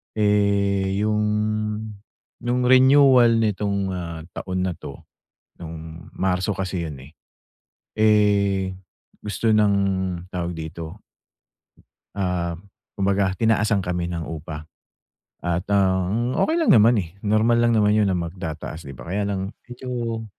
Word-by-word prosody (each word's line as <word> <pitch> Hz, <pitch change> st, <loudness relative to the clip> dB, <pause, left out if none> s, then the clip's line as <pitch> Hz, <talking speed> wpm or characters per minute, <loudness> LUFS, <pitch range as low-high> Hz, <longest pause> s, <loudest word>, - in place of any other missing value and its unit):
Eh, 100 Hz, -1 st, +1 dB
yung 105 Hz, 0 st, +1 dB, 1.2 s
nung 125 Hz, +1 st, 0 dB
renewal 130 Hz, -2 st, +6 dB
nitong, 100 Hz, -2 st, -1 dB
ah, 85 Hz, -3 st, -5 dB
taon 95 Hz, -1 st, -3 dB
na 95 Hz, -, 0 dB
'to, -, -, -10 dB, 0.5 s
nung 80 Hz, 0 st, -9 dB
Marso 95 Hz, +2 st, 0 dB
kasi 95 Hz, -3 st, -3 dB
yun, 70 Hz, -4 st, -8 dB
eh. -, -, -19 dB, 0.9 s
Eh, 100 Hz, -3 st, +3 dB, 0.5 s
gusto 105 Hz, +2 st, -1 dB
ng 105 Hz, -2 st, +4 dB, 0.6 s
tawag 90 Hz, -1 st, -3 dB
dito 80 Hz, +4 st, -7 dB, 1.1 s
ah, 90 Hz, -3 st, -1 dB, 0.4 s
kumbaga 100 Hz, -1 st, +1 dB
tinaasan 105 Hz, -1 st, +2 dB
kami 90 Hz, -1 st, -2 dB
ng 85 Hz, -1 st, -4 dB
upa 80 Hz, -1 st, -7 dB, 0.8 s
at 85 Hz, 0 st, 0 dB
ang 100 Hz, +4 st, +1 dB
okey 320 Hz, -, +2 dB
lang 330 Hz, -, +4 dB
naman, 115 Hz, +2 st, +6 dB
eh. 85 Hz, -6 st, -2 dB
Normal 110 Hz, +3 st, +2 dB
lang 120 Hz, -1 st, +3 dB
naman 105 Hz, -1 st, +3 dB
yun 105 Hz, -1 st, +3 dB
na 95 Hz, -, +1 dB
magtataas, 85 Hz, -2 st, -5 dB
'di 70 Hz, -, -9 dB
ba? -, -, -10 dB
Kaya 100 Hz, +1 st, -1 dB
lang 95 Hz, 0 st, -3 dB, 0.2 s
medyo 120 Hz, -2 st, -4 dB
100 Hz, 125 wpm, -23 LUFS, 90-110 Hz, 1.2 s, renewal